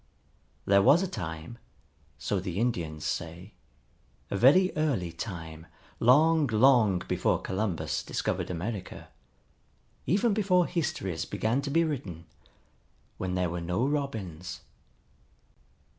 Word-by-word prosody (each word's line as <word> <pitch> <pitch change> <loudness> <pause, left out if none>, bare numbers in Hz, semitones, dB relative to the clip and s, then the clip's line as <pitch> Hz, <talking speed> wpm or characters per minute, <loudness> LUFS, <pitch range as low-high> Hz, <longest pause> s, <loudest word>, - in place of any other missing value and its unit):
There 100 0 +5
was 155 - +5
a - - -1
time, 80 - -6 0.6
so 100 - -1
the 90 -1 -5
Indians 85 -10 -2
say, 85 +4 -5 0.8
a - - -1
very 150 - +5
early 135 - 0
time, 80 -3 -7 0.3
long, 155 +5 +5
long 110 -5 +4
before - - +1
Columbus 95 -3 -2
discovered - - -2
America, 90 +3 -5 1.0
even 200 - +2
before 185 -4 +3
histories 100 - -2
began 115 +5 -1
to 140 - -4
be 165 +4 +3
written, 100 - -4 0.9
when 90 -1 -2
there 90 -2 0
were 85 0 -4
no 90 +8 0
Robins. 110 - -4
105 Hz, 115 wpm, -28 LUFS, 90-145 Hz, 1.0 s, There